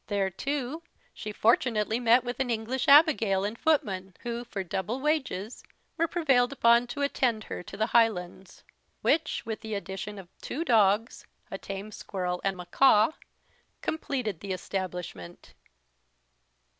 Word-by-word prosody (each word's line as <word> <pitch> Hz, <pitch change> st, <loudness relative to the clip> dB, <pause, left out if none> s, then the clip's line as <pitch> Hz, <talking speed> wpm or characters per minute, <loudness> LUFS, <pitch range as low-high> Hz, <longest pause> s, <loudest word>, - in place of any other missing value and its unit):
There, 200 Hz, -2 st, 0 dB
too, 280 Hz, -, -3 dB, 0.3 s
she 210 Hz, -, -6 dB
fortunately 225 Hz, 0 st, +2 dB
met 240 Hz, +1 st, +4 dB
with 245 Hz, +1 st, -5 dB
an 265 Hz, -2 st, 0 dB
English 235 Hz, +3 st, -2 dB
Abigail 280 Hz, -, +5 dB
and 210 Hz, +2 st, -3 dB
footman, 195 Hz, -, 0 dB
who, 235 Hz, 0 st, -4 dB
for 210 Hz, -5 st, -5 dB
double 190 Hz, +7 st, -3 dB
wages, 265 Hz, -8 st, -2 dB, 0.3 s
were 335 Hz, -, +1 dB
prevailed 270 Hz, -8 st, +2 dB
upon 235 Hz, -2 st, +4 dB
to 285 Hz, +3 st, -3 dB
attend 245 Hz, -6 st, 0 dB
her -, -, -6 dB
to 195 Hz, -, -10 dB
the 215 Hz, -, +2 dB
Highlands; 195 Hz, -6 st, 0 dB, 0.4 s
which, 320 Hz, -, +1 dB
with 220 Hz, -1 st, -5 dB
the 220 Hz, -1 st, -4 dB
addition 200 Hz, +1 st, -6 dB
of 190 Hz, -3 st, -10 dB
two 325 Hz, +5 st, -4 dB
dogs, 220 Hz, -, +2 dB, 0.2 s
a -, -, -5 dB
tame 195 Hz, +2 st, -7 dB
squirrel, 180 Hz, -3 st, -4 dB
and 195 Hz, -1 st, -1 dB
mackaw, 210 Hz, -, +4 dB, 0.7 s
completed 255 Hz, -, -2 dB
the 195 Hz, +1 st, -4 dB
establishment. 180 Hz, -, -6 dB
220 Hz, 140 wpm, -28 LUFS, 195-255 Hz, 0.7 s, Abigail